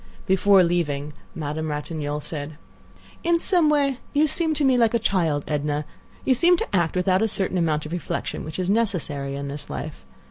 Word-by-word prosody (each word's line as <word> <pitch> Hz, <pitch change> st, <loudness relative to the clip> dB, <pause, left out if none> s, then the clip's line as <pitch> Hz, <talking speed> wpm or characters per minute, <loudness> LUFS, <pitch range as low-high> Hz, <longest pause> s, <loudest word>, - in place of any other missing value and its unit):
Before 190 Hz, 0 st, +5 dB
leaving 150 Hz, -4 st, -1 dB, 0.2 s
Madame 155 Hz, 0 st, -3 dB
Ratignolle 150 Hz, 0 st, -3 dB
said: 150 Hz, 0 st, -6 dB, 0.7 s
"In 340 Hz, 0 st, +3 dB
some 335 Hz, -2 st, +3 dB
way 280 Hz, -3 st, +2 dB
you 295 Hz, +1 st, +4 dB
seem 315 Hz, +1 st, +1 dB
to 295 Hz, -, +1 dB
me 260 Hz, -1 st, +4 dB
like 235 Hz, -1 st, +3 dB
a -, -, +5 dB
child, 170 Hz, -10 st, 0 dB
Edna. 150 Hz, 0 st, -1 dB, 0.4 s
You 265 Hz, -, +4 dB
seem 345 Hz, +7 st, +4 dB
to 205 Hz, -, -3 dB
act 170 Hz, -2 st, +1 dB
without 185 Hz, +1 st, +2 dB
a 225 Hz, -, +3 dB
certain 190 Hz, -3 st, -1 dB
amount 155 Hz, -3 st, 0 dB
of 155 Hz, -, -7 dB
reflection 175 Hz, 0 st, -4 dB
which 155 Hz, 0 st, -6 dB
is 185 Hz, -1 st, -1 dB
necessary 160 Hz, -11 st, -1 dB
in 140 Hz, 0 st, -4 dB
this 145 Hz, +1 st, -6 dB
life. 155 Hz, 0 st, -6 dB
175 Hz, 185 wpm, -24 LUFS, 150-230 Hz, 0.7 s, Before